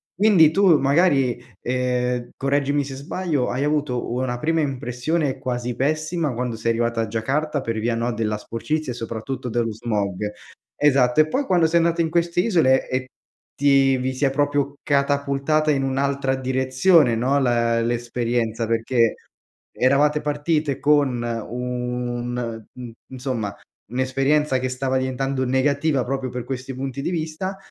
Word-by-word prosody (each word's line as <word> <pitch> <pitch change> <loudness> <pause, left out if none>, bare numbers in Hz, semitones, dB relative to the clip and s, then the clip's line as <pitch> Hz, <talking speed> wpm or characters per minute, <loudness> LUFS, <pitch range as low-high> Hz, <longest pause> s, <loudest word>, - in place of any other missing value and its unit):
Quindi 185 -6 +5
tu 190 -2 +5
magari, 135 -4 +2 0.2
ehm, 125 -1 -1
correggimi 140 +1 +1
se 135 0 -7
sbaglio, 145 0 -2
hai 130 +3 -1
avuto 145 -5 -1
una 125 -1 -1
prima 160 +4 0
impressione 135 +2 -2
quasi 125 -2 -3
pessima 155 +3 -1
quando 125 -1 -2
sei 115 +1 -2
arrivata 115 0 0
a 115 - -2
Giacarta 140 +7 -1
per 115 -3 -3
via, 115 +1 0
no, 120 +1 -1
della 105 -1 -1
sporcizia, 130 +7 -3
e - - -6
soprattutto 120 +2 -5
dello 115 -1 -1
smog 105 -2 -2 0.4
esatto, 135 -3 +3
e 155 - +2
poi 270 - -1
quando 175 -8 +3
sei 160 +1 +3
andata 170 0 +1
in 160 - 0
queste 170 +1 +1
isole 160 - +3
e 130 0 -2 0.5
ti 135 -1 +4
vi 130 +1 -2
si 130 +3 0
è 135 - +2
proprio 145 0 0
catapultata 140 +2 +1
in 135 -2 +1
un'altra 135 0 0
direzione, 130 +2 +3
no, 130 +5 +1
la 120 -3 +2
l'esperienza. 120 -1 -1
Perché 115 +1 +1 0.6
eravate 145 +4 +2
partite 150 -1 -1
con 145 -5 +2 0.3
un 125 -1 -3
mhmm, 125 -2 -8 0.2
insomma, 125 -6 -3 0.4
un'esperienza 135 +2 +1
che 130 - -2
stava 130 +1 -1
diventando 130 +1 -1
negativa 140 +2 +1
proprio 135 0 -3
per 125 -1 -4
questi 130 +1 -5
punti 135 +1 -4
di 175 - -2
vista, 170 +4 -3
130 Hz, 145 wpm, -22 LUFS, 120-145 Hz, 0.6 s, Quindi